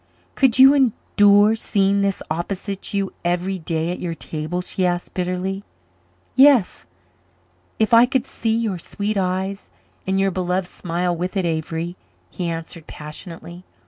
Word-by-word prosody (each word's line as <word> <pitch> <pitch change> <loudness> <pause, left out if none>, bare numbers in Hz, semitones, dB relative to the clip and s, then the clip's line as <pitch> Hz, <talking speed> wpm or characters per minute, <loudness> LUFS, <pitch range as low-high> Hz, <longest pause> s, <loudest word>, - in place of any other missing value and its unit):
"Could 260 -4 +3
you 265 +1 +9
endure 210 -5 +4
seeing 200 -2 +1
this 200 -1 -1
opposite 190 +4 -3
to 200 - -4
you 195 -1 -2
every 180 +2 -1
day 165 +1 -2
at 180 - -5
your 170 -2 -4
table?" 155 +3 -4
she 185 - -3
asked 175 -1 -1
bitterly. 185 +2 -2 0.7
"Yes 265 -6 +5 0.9
if 220 0 +1
I 235 +2 +8
could 260 0 0
see 225 -4 -1
your 215 -6 -2
sweet 205 +5 -3
eyes 190 +1 -2 0.4
and 190 0 +1
your 195 0 +2
beloved 180 0 -1
smile 175 0 -2
with 180 +4 -3
it, 190 - 0
Avery," 165 +2 -3 0.3
he 175 -2 -3
answered 165 0 -6
passionately. 170 +3 -9
185 Hz, 145 wpm, -21 LUFS, 175-205 Hz, 0.9 s, you